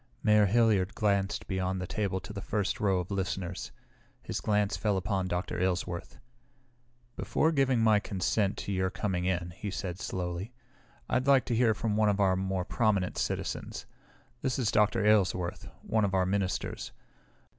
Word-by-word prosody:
Mayor 105 -1 +5
Hilliard 105 -3 +3
glanced 100 -2 0
beyond 95 -1 -1
the 90 - -3
table 95 0 -1
to 100 +3 -9
the 100 - -5
first 100 -1 -1
row 100 -3 +2
of 90 - -8
listeners. 95 -1 -3 0.5
His - - -4
glance 105 -1 +1
fell 105 -3 0
upon 95 -1 -1
Dr. 90 0 -2
Aylesworth. 90 -1 -2 1.0
"Before 160 - +1
giving 135 -5 +2
my 110 -2 +5
consent 100 +1 0
to - - -4
your 95 -1 +1
coming 95 -2 -2
in," 90 -2 -1
he 100 +4 -6
said 95 -2 -4
slowly, 90 +5 -4 0.5
"I'd 125 +1 0
like 135 -2 +5
to 120 - -1
hear 115 -2 +3
from 105 0 -1
one 110 -1 +4
of 100 0 0
our 95 -2 +4
more 95 -1 -1
prominent 100 -4 +1
citizens. - - -3 0.6
This 130 -3 -1
is 120 -6 +1
Dr. 105 +1 +3
Aylesworth, 95 -4 +2 0.2
one 110 -1 +1
of 95 -1 +1
our 95 -1 +3
ministers. 95 0 -2
100 Hz, 165 wpm, -30 LUFS, 95-110 Hz, 1.0 s, Mayor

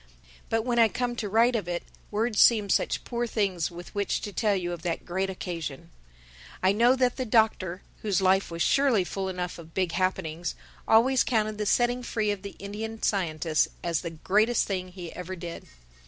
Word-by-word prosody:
But 225 0 +1
when 240 -1 +1
I 230 - +7
come 245 +2 -2
to 210 -4 -3
write 230 +4 +4
of 210 -6 -2
it, 175 -1 -2 0.3
words 215 +1 0
seem 215 -4 +5
such - - +1
poor 240 0 -2
things 195 -7 0
with 175 0 -10
which 205 -1 0
to 205 - -6
tell 210 -2 +2
you 175 -2 -2
of 175 -2 -5
that 170 -1 -3
great 190 +2 -1
occasion. 170 -4 -5 0.7
I 190 - +5
know 235 +5 +4
that 250 -2 +1
the 260 - -1
Doctor, 215 -6 +1 0.2
whose 205 -4 +1
life 190 +1 +3
was 170 0 -1
surely 270 -8 +3
full 190 +1 -3
enough 180 -1 -4
of 165 -1 -13
big 185 -3 +1
happenings, 175 -2 -1 0.3
always 250 +4 +5
counted 215 -2 0
the 210 - -1
setting 245 +3 +2
free 220 -3 -1
of 205 -2 -4
the 200 0 -8
Indian 220 +3 -6
scientist 160 -5 +1 0.2
as 170 -3 0
the 170 - -4
greatest 210 +8 +2
thing 185 -2 -3
he 180 -2 -9
ever 180 +1 -6
did. 170 -1 -8
195 Hz, 195 wpm, -27 LUFS, 175-225 Hz, 0.7 s, I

